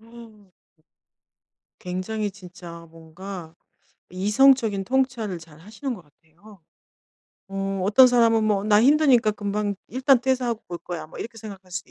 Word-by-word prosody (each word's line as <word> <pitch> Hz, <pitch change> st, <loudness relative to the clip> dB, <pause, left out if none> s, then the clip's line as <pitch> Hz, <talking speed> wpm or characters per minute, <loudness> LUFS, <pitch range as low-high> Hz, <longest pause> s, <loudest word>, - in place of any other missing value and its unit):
어 225 Hz, -3 st, -16 dB, 1.3 s
굉장히 200 Hz, +3 st, -4 dB
진짜 175 Hz, -3 st, -12 dB
뭔가 165 Hz, +1 st, -10 dB, 0.5 s
이성적인 210 Hz, +2 st, +3 dB
통찰을 245 Hz, -7 st, -1 dB
잘하시는 185 Hz, -, -8 dB
것 205 Hz, -, -10 dB
같아요. 165 Hz, +6 st, -21 dB, 0.9 s
어 195 Hz, 0 st, -3 dB
어떤 235 Hz, +6 st, +7 dB
사람은 230 Hz, -3 st, +3 dB
뭐 205 Hz, -2 st, +1 dB
'나 210 Hz, 0 st, +4 dB
힘드니까 270 Hz, -5 st, +4 dB
금방 205 Hz, 0 st, -2 dB
일단 260 Hz, +1 st, +3 dB
퇴사하고 250 Hz, -3 st, -1 dB
볼 175 Hz, -1 st, -5 dB
거야.' 170 Hz, -2 st, -7 dB
뭐 -, -, -13 dB
이렇게 225 Hz, -1 st, -7 dB
생각할 195 Hz, -4 st, -11 dB
수도 180 Hz, +1 st, -6 dB
205 Hz, 275 characters per minute, -24 LUFS, 185-235 Hz, 1.3 s, 어떤